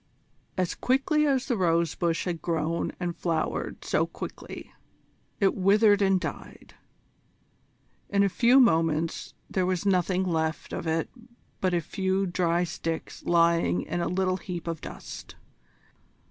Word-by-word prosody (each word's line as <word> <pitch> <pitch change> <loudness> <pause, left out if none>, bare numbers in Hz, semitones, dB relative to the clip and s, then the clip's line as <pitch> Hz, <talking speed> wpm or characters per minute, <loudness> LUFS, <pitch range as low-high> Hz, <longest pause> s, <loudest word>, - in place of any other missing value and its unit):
As 180 -2 0
quickly 285 +4 +2
as 270 -2 +1
the 245 - 0
rose 170 -4 +2
bush 170 -1 -1
had 175 -3 -3
grown 165 0 -1
and 175 -2 -2
flowered 165 -3 -2
so - - +1
quickly, - - -8 0.7
it 195 -2 +3
withered 205 +2 +4
and 195 -1 +3
died. - - -7 1.4
In 200 0 +3
a - - +4
few 240 +7 +5
moments 165 - +2
there 185 -1 0
was 185 +1 -1
nothing 185 -1 +2
left 160 -3 -2
of - - -4
it 160 0 0 0.5
but 185 -2 +1
a 170 - +1
few 190 +3 -1
dry 175 -1 +1
sticks 165 -1 -4
lying 170 - +3
in 175 +2 -3
a - - 0
little 185 0 0
heap 180 -3 -6
of 165 -2 -3
dust. - - -9
180 Hz, 140 wpm, -27 LUFS, 165-195 Hz, 1.4 s, few